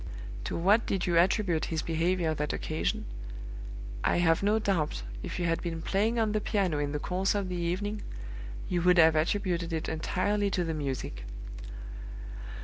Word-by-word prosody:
To -, -, -2 dB
what 200 Hz, +7 st, +4 dB
did 190 Hz, -2 st, 0 dB
you 175 Hz, -, +1 dB
attribute 175 Hz, -1 st, +3 dB
his 160 Hz, -1 st, -2 dB
behavior 165 Hz, 0 st, +1 dB
that 150 Hz, -1 st, -1 dB
occasion? 155 Hz, -, -1 dB, 1.0 s
I -, -, +3 dB
have 165 Hz, -2 st, +4 dB
no 205 Hz, +2 st, +4 dB
doubt, 170 Hz, -, 0 dB, 0.2 s
if -, -, -4 dB
you 175 Hz, -, 0 dB
had 165 Hz, 0 st, +1 dB
been 165 Hz, -2 st, -3 dB
playing 215 Hz, +6 st, +2 dB
on 220 Hz, -2 st, +2 dB
the 215 Hz, 0 st, +1 dB
piano 190 Hz, -8 st, +1 dB
in 145 Hz, -1 st, 0 dB
the 150 Hz, -, 0 dB
course 185 Hz, +6 st, 0 dB
of 200 Hz, -2 st, 0 dB
the 180 Hz, -, -2 dB
evening, 185 Hz, +5 st, -1 dB, 0.7 s
you 175 Hz, -1 st, +1 dB
would 180 Hz, +1 st, +5 dB
have 160 Hz, -1 st, +7 dB
attributed 170 Hz, +1 st, +1 dB
it 160 Hz, -1 st, -1 dB
entirely 200 Hz, +5 st, +1 dB
to 180 Hz, -2 st, +1 dB
the 165 Hz, -1 st, -1 dB
music! 135 Hz, -, -3 dB
175 Hz, 170 wpm, -30 LUFS, 160-200 Hz, 1.0 s, have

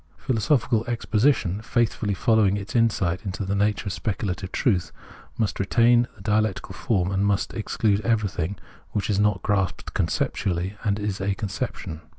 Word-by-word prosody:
Philosophical 120 Hz, -1 st, +1 dB
exposition, 110 Hz, -4 st, +1 dB
faithfully 110 Hz, -2 st, 0 dB
following 105 Hz, -2 st, +3 dB
its 100 Hz, +3 st, -7 dB
insight 95 Hz, -7 st, +1 dB
into 95 Hz, 0 st, -4 dB
the 95 Hz, -, -1 dB
nature 105 Hz, +1 st, +1 dB
of 100 Hz, -, -2 dB
specu 105 Hz, -1 st, -2 dB
lative 95 Hz, +1 st, -8 dB
truth, 95 Hz, -, +1 dB, 0.5 s
must 110 Hz, -3 st, -1 dB
retain 120 Hz, +4 st, +4 dB
the -, -, -16 dB
dialectical 105 Hz, -2 st, 0 dB
form, 95 Hz, -2 st, 0 dB
and 100 Hz, +1 st, +2 dB, 0.2 s
exclude 105 Hz, -1 st, 0 dB
everything 100 Hz, -5 st, 0 dB, 0.4 s
which 105 Hz, 0 st, 0 dB
is 100 Hz, -, +1 dB
not 105 Hz, -2 st, +2 dB
grasped 95 Hz, -4 st, -1 dB
conceptually 95 Hz, +2 st, -1 dB
and 100 Hz, -2 st, +1 dB
is 105 Hz, -2 st, -3 dB
a 95 Hz, 0 st, 0 dB
conception. 95 Hz, -5 st, -4 dB
105 Hz, 150 wpm, -25 LUFS, 95-110 Hz, 0.5 s, retain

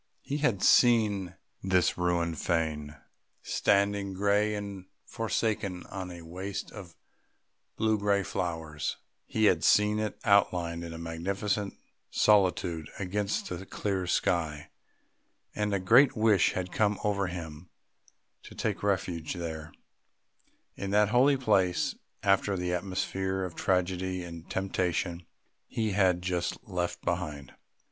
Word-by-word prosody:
He 145 Hz, -, -2 dB
had 125 Hz, -10 st, +1 dB
seen 105 Hz, -7 st, +4 dB, 0.3 s
this 95 Hz, -2 st, +2 dB
ruined 85 Hz, -3 st, 0 dB
fane 80 Hz, -4 st, -1 dB, 0.5 s
standing 100 Hz, 0 st, +1 dB
grey 105 Hz, +2 st, +2 dB
and 100 Hz, -2 st, -6 dB, 0.2 s
forsaken 110 Hz, -5 st, -2 dB
on 95 Hz, -1 st, -5 dB
a 85 Hz, -1 st, -9 dB
waste 95 Hz, +4 st, -5 dB
of 95 Hz, -5 st, -10 dB, 0.8 s
blue 110 Hz, -1 st, +1 dB
grey 100 Hz, -1 st, +2 dB
flowers; 80 Hz, -5 st, -3 dB, 0.3 s
he 110 Hz, -1 st, +1 dB
had 90 Hz, -5 st, +3 dB
seen 105 Hz, +1 st, +4 dB
it 110 Hz, -1 st, -2 dB
outlined 85 Hz, -4 st, +2 dB
in 85 Hz, 0 st, -7 dB
magnificent 100 Hz, +5 st, -2 dB, 0.3 s
solitude 90 Hz, -6 st, +2 dB
against 100 Hz, +2 st, -2 dB
the 90 Hz, +1 st, -5 dB
clear 95 Hz, -1 st, -2 dB
sky, 80 Hz, -4 st, 0 dB, 0.8 s
and 105 Hz, -1 st, -1 dB
a 100 Hz, -, +2 dB
great 120 Hz, +8 st, +5 dB
wish 110 Hz, -4 st, +4 dB
had 90 Hz, -1 st, -3 dB
come 105 Hz, -1 st, +1 dB
over 100 Hz, -2 st, +1 dB
him 85 Hz, -1 st, -7 dB, 0.7 s
to -, -, -13 dB
take -, -, -2 dB
refuge 90 Hz, -4 st, -1 dB
there, 80 Hz, -2 st, -5 dB, 1.0 s
in 100 Hz, -, -4 dB
that 105 Hz, +1 st, +4 dB
holy 130 Hz, +4 st, +4 dB
place, 100 Hz, -8 st, +2 dB, 0.3 s
after 100 Hz, 0 st, +2 dB
the 90 Hz, 0 st, -1 dB
atmosphere 95 Hz, +1 st, -2 dB
of 90 Hz, -2 st, -4 dB
tragedy 90 Hz, 0 st, 0 dB
and 85 Hz, -1 st, -9 dB
temptation 90 Hz, -2 st, -1 dB, 0.4 s
he 110 Hz, -2 st, -1 dB
had 95 Hz, -3 st, +2 dB
just 90 Hz, -1 st, -1 dB
left 90 Hz, -3 st, -3 dB
behind. 70 Hz, -2 st, -3 dB
95 Hz, 125 wpm, -29 LUFS, 85-105 Hz, 1.0 s, great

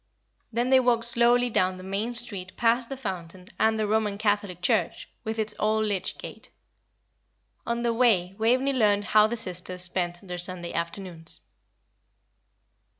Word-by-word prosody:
Then 240 Hz, +3 st, 0 dB
they 265 Hz, -, +7 dB
walked 240 Hz, -2 st, +2 dB
slowly 240 Hz, +1 st, +3 dB
down 185 Hz, -2 st, +1 dB
the 185 Hz, -, -10 dB
main 205 Hz, +5 st, -2 dB
street 200 Hz, -6 st, -2 dB
past 235 Hz, +1 st, +2 dB
the 270 Hz, -, -5 dB
fountain 185 Hz, -5 st, -6 dB
and 220 Hz, 0 st, +3 dB
the 215 Hz, -, 0 dB
Roman 210 Hz, -1 st, 0 dB
Catholic 205 Hz, -4 st, 0 dB
church, 180 Hz, -, 0 dB, 0.2 s
with 220 Hz, -1 st, -3 dB
its 215 Hz, -1 st, -1 dB
old 215 Hz, +1 st, +2 dB
lych 195 Hz, -3 st, -2 dB
gate. -, -, -10 dB, 1.2 s
On 235 Hz, 0 st, -1 dB
their 235 Hz, -1 st, +1 dB
way 210 Hz, -7 st, +3 dB
Waveney 255 Hz, +5 st, +2 dB
learned 205 Hz, -5 st, +3 dB
how 215 Hz, +1 st, +5 dB
the 235 Hz, +2 st, -3 dB
sisters 180 Hz, -3 st, -3 dB
spent 175 Hz, 0 st, -3 dB
their 180 Hz, 0 st, -5 dB
Sunday 175 Hz, -1 st, -3 dB
afternoons. 170 Hz, -1 st, -4 dB
210 Hz, 150 wpm, -26 LUFS, 185-235 Hz, 1.2 s, they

